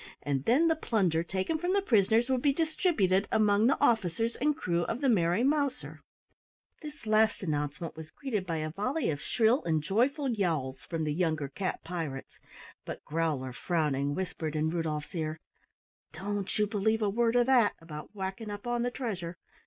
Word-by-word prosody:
and 140 -1 -1
then 285 +8 +4
the 320 - +3
plunder 190 - +1
taken 190 - -2
from 355 +3 0
the 400 - +3
prisoners 225 - +3
would 260 -2 +1
be 285 - +4
distributed 290 - +1
among 210 0 +4
the 275 - +2
officers 225 +1 +2
and 295 +2 +1
crew 170 -1 0
of - - -3
the 280 - +1
Merry 185 -2 +3
Mouser. 280 0 0 0.8
This 300 -5 -9
last 215 0 +3
announcement 150 +1 -3
was 160 -1 -9
greeted 215 - -3
by 165 - -1
a 155 0 -3
volley 255 - -1
of 145 - -4
shrill 235 +3 +2
and 160 -3 0
joyful 255 - +1
yowls 155 - -1
from 165 +4 -3
the 150 -1 0
younger 155 -4 0
cat 190 +5 -3
pirates, 160 -6 -5 0.4
but - - -7
Growler, 150 -5 -1
frowning, 145 -2 0
whispered 165 -4 -3
in 155 +1 +1
Rudolf's 155 -3 -3
ear: 155 -2 -3 0.7
"Don't 200 +3 -3
you 210 - +3
believe 220 +1 0
a - - +2
word 230 +2 +2
of 245 0 +5
that, 245 -5 +4
about 160 +4 -9
whacking 190 +3 -4
up 205 +1 -6
on 240 0 0
the 245 - +1
treasure! 190 -9 -4
195 Hz, 175 wpm, -30 LUFS, 160-240 Hz, 0.8 s, of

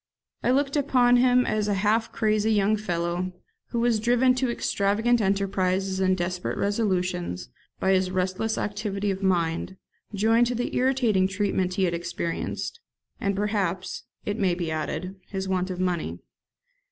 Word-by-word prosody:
I - - 0
looked 275 +2 +2
upon 250 -4 +4
him 250 0 +4
as 210 -1 0
a 205 - +1
half 215 +3 +1
crazy 215 -1 +1
young 210 0 +3
fellow, 180 -2 -2 0.3
who 235 - -2
was 235 -2 +2
driven 245 +3 +3
to 255 0 0
extravagant 225 +1 +1
enterprises 190 -1 0
and 185 0 +2
desperate 180 0 -2
resolutions 185 - -1 0.3
by 190 - +2
his 185 -1 +2
restless 185 +4 -1
activity 205 -1 -2
of 190 0 -4
mind, 180 0 0 0.4
joined 225 +4 +3
to 245 - -1
the 245 +1 -2
irritating 245 -7 +2
treatment 190 -2 -1
he 195 - +1
had 175 -2 +1
experienced, 170 - -3 0.4
and, 200 0 0
perhaps, 195 -3 -2 0.2
it 205 +2 -2
may 185 -4 +2
be 170 -2 -3
added, 180 +4 -3
his 190 -1 -4
want 185 0 0
of 180 -1 -4
money. 180 -2 -1
195 Hz, 155 wpm, -26 LUFS, 185-225 Hz, 0.4 s, upon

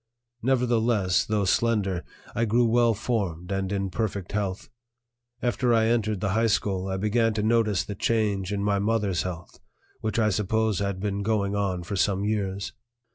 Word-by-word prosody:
Nevertheless, 115 -6 +2
though 105 -2 0
slender, 100 -3 +1 0.3
I 115 - +1
grew 120 +2 +3
well 115 0 +3
formed 100 -6 -2
and 95 -1 -1
in 100 -1 -1
perfect 100 -4 -3
health. 100 -2 -2 0.8
After 120 0 +2
I 110 0 +3
entered 110 -4 0
the 100 - 0
high 115 +3 +2
school, 95 -3 0
I 95 0 -2
began 110 +2 +1
to 105 - 0
notice 110 -5 +2
the 105 - -6
change 100 -3 0
in 100 -1 -1
my 100 -1 +1
mother's 105 -4 +1
health, 90 -2 -7 0.4
which 110 -1 -2
I 110 -2 +3
suppose 105 +1 0
had 100 -2 -2
been 100 0 -2
going 100 -1 0
on 95 -3 -1
for 95 +4 -4
some 100 +1 +1
years. 100 -2 -2
105 Hz, 170 wpm, -26 LUFS, 95-115 Hz, 0.8 s, grew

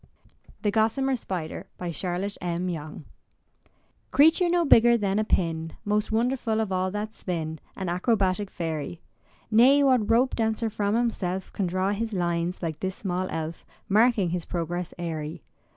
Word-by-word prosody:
THE 205 - +2
GOSSAMER 230 +5 +2
SPIDER 185 -4 -5 0.2
Charlotte 180 +4 -2
M. 175 +1 -2
Yonge 155 -3 -6 1.0
Creature 320 +5 +5
no 345 -1 +2
bigger 235 -3 +6
than 200 -1 0
a - - +2
pin, 165 -5 -1
Most 210 +1 0
wonderful 230 -1 +1
of 220 -3 -1
all 185 0 +1
that 210 +2 -4
spin, 160 -6 -4 0.2
An 190 - -3
acrobatic 190 +1 +1
fairy. 165 -1 -4 0.5
Nay, 260 +6 +6
what 250 -6 +3
rope 245 +3 +3
dancer 225 0 0
from 205 0 0
himself 190 -6 -1
Can 195 - -1
draw 185 +2 0
his 220 +2 -2
lines, 175 0 -1
like 160 -2 -3
this 190 0 -3
small 185 -1 -2
elf, 160 0 -4 0.2
Marking 215 -3 +3
his 175 -1 -2
progress 175 0 -3
airy. 160 -2 -5
195 Hz, 150 wpm, -26 LUFS, 175-225 Hz, 1.0 s, bigger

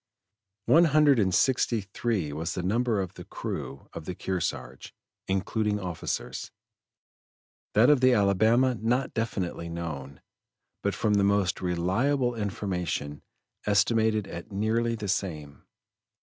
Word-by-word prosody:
One 170 +2 +6
hundred 150 -4 +5
and 95 -3 +2
sixty 120 +2 +2
three 100 -5 -2
was 80 +2 -3
the 90 - -3
number 115 +3 +1
of 95 - -5
the - - -10
crew 70 - -6
of 80 - -7
the 90 - -5
Kearsarge, 95 -2 -4 0.3
including 105 +2 0
officers; 90 -4 -4 1.3
that 110 +4 +6
of 145 -4 +3
the 130 0 +6
Alabama 110 +4 +3
not 120 +4 -1
definitely 95 -7 -3
known, 75 -5 -6 0.6
but - - -1
from 105 - +1
the 100 -1 +3
most 100 -2 +1
reliable 110 +10 +1
information 95 -8 -3 0.5
estimated 110 +1 +2
at 85 +3 -8
nearly 115 +3 0
the 105 -2 -5
same. 75 -7 -3
100 Hz, 125 wpm, -27 LUFS, 90-115 Hz, 1.3 s, One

